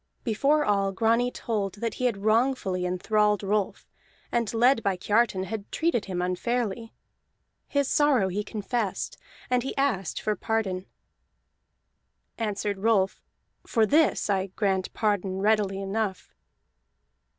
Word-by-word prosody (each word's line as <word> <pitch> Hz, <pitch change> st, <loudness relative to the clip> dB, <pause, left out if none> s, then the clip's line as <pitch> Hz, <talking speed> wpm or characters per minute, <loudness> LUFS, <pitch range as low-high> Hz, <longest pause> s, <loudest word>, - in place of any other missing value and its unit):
Before 280 Hz, +6 st, +2 dB
all, 200 Hz, -1 st, +2 dB
Grani 230 Hz, +4 st, +2 dB
told 210 Hz, -6 st, -3 dB
that 230 Hz, +2 st, -3 dB
he 255 Hz, -, -3 dB
had 235 Hz, -5 st, +1 dB
wrongfully 215 Hz, -5 st, +1 dB
enthralled 210 Hz, +3 st, +1 dB
Rolf, 200 Hz, 0 st, -1 dB, 0.4 s
and 235 Hz, -3 st, 0 dB
led 240 Hz, +2 st, +4 dB
by 195 Hz, -3 st, 0 dB
Kiartan 205 Hz, 0 st, +1 dB
had 205 Hz, +1 st, -6 dB
treated 320 Hz, -9 st, 0 dB
him 180 Hz, -2 st, -2 dB
unfairly. 225 Hz, +4 st, -2 dB, 0.8 s
His 280 Hz, -1 st, +1 dB
sorrow 275 Hz, -10 st, +3 dB
he 205 Hz, +3 st, -2 dB
confessed, 215 Hz, -1 st, -3 dB, 0.3 s
and 250 Hz, -1 st, +3 dB
he 270 Hz, -, -5 dB
asked 240 Hz, -11 st, 0 dB
for 215 Hz, -, -1 dB
pardon. 195 Hz, -3 st, -2 dB, 1.5 s
Answered 205 Hz, -2 st, -2 dB
Rolf: 195 Hz, -2 st, +2 dB, 0.5 s
"For 225 Hz, -2 st, +3 dB
this 305 Hz, +7 st, +3 dB
I 195 Hz, -2 st, +1 dB
grant 190 Hz, -1 st, -1 dB
pardon 200 Hz, -3 st, 0 dB
readily 205 Hz, -1 st, +2 dB
enough." 195 Hz, 0 st, -3 dB
210 Hz, 125 wpm, -27 LUFS, 195-235 Hz, 1.5 s, led